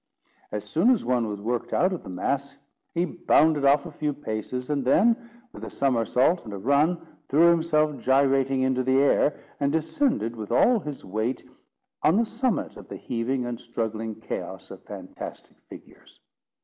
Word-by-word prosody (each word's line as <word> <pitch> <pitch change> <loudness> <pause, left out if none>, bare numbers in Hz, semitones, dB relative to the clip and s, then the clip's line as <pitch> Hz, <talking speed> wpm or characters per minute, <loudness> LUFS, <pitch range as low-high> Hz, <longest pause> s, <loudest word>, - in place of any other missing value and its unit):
As 105 0 -4
soon 165 - +2
as 250 - +2
one 120 -2 +1
was 105 -1 -5
worked 115 +3 -3
out 185 +1 +2
of 180 - -5
the - - -11
mass, 140 +10 -2 0.4
he 170 +1 +2
bounded 155 -4 +2
off 140 +2 +4
a 170 - -7
few 150 0 -2
paces, 125 +1 -4
and 140 -2 0
then, 210 - +4 0.4
with - - -10
a - - -5
somersault 130 +5 +1
and 110 - -9
a - - -5
run, 145 - +1 0.2
threw 165 +5 +6
himself 155 -3 +1
gyrating 135 0 +2
into 130 -1 +1
the 130 +1 +2
air, 145 +1 +3 0.2
and 140 0 +1
descended 160 - 0
with 110 -1 -7
all 235 - +4
his 150 -6 -7
weight 110 +6 -3 0.5
on 160 - +4
the 230 +3 +3
summit 235 +1 -2
of - - -12
the - - -7
heaving 125 +2 -2
and 120 -1 -4
struggling 110 -1 -4
chaos 110 - -6
of - - -10
fantastic - - -9
figures. - - -15
135 Hz, 175 wpm, -25 LUFS, 120-160 Hz, 0.5 s, threw